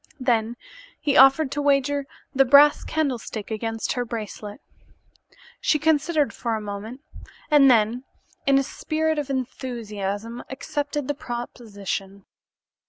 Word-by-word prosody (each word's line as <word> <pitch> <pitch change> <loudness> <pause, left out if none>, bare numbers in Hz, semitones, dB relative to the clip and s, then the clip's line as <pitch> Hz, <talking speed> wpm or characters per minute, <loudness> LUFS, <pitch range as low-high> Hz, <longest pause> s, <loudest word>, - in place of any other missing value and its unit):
Then 235 -2 0 0.4
he 285 -2 0
offered 270 +2 +6
to 290 - -2
wager 280 0 +1 0.3
the 270 -1 +5
brass 285 +3 +6
candlestick 245 -8 -3
against 225 +1 -3
her 245 - -1
bracelet. 215 -3 -7 1.0
She 305 - +2
considered 310 0 +1
for 230 -2 -2
a - - -2
moment 210 +5 -7 0.5
and 285 -2 +7
then, 235 +2 +2 0.4
in 275 0 +5
a 275 - +3
spirit 315 +3 -1
of 290 -2 -4
enthusiasm, 230 -4 -4
accepted 290 +1 -3
the 290 - 0
proposition. 205 -6 -6
255 Hz, 120 wpm, -24 LUFS, 220-285 Hz, 1.0 s, and